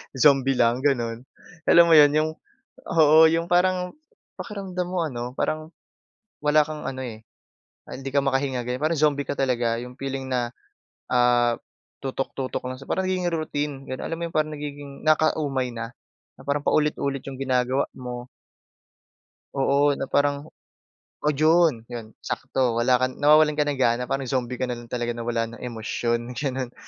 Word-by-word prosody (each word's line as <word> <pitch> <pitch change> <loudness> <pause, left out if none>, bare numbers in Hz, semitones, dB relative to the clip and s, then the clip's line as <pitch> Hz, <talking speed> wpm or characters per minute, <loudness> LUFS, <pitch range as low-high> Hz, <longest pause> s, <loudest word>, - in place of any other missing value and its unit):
Zombie 135 0 +4
lang, 120 +1 +3
gano'n? 120 -4 0 0.4
Alam 170 - +8
mo - - +8
yon, 145 -1 +8
yung 155 +1 +2 0.6
oo, 155 -3 +6
yung 165 +1 0
parang, 180 +1 +1 0.4
pakiramdam 190 -4 -5
mo, 180 -2 0
ano, 125 -3 -4
parang 155 +1 -2 0.7
wala 150 +1 +4
kang 155 -1 -6
ano, 130 0 -4
eh, 110 -2 -9 0.7
hindi 135 +1 -6
ka 140 - +4
makahinga, 135 -2 0
ganyan, 125 +1 -3
parang 160 +2 +1
zombie 145 -2 +2
ka - - -1
talaga, 120 -3 +1
'yong 125 +1 -9
feeling 135 -1 -4
na, 120 -1 -1 0.6
ah, 120 -1 +4 0.5
tutok-tutok 135 0 -3
lang 130 - -4
siya, 135 - -13
parang 190 0 0
nagiging 180 -2 0
routine, 150 -2 -2
ganun, 130 - -5
alam 165 - -3
mo - - -4
'yong - - -19
parang 155 0 +1
nagiging, 145 -1 -8
nakaka-umay 150 -4 +2
na, 115 0 -5 0.5
na - - -12
parang 145 0 0
paulit-ulit 140 -3 +1
yung 135 -1 -7
ginagawa 130 0 +1
mo. 125 -1 -7 1.3
Oo, 140 +1 +3
na 135 -1 -5
parang 145 +1 +1 0.7
oh, 150 - +2
yun, 155 -5 +3
yun, 115 -2 -8
sakto, 125 -3 -1
wala 120 +2 +3
kang 130 +1 -2
nawawalan 150 +1 +6
ka 150 - 0
ng 140 - -2
gana, 125 0 +1
parang 135 0 -1
zombie 125 -1 -2
ka 130 - -1
na 125 - -3
rin 120 -1 -10
talaga 120 -1 -2
na 120 - -6
wala 115 -1 -1
ng 115 +1 -11
emosyon, 120 +1 -2
ganun, 130 -1 -3
135 Hz, 165 wpm, -24 LUFS, 125-150 Hz, 1.3 s, Alam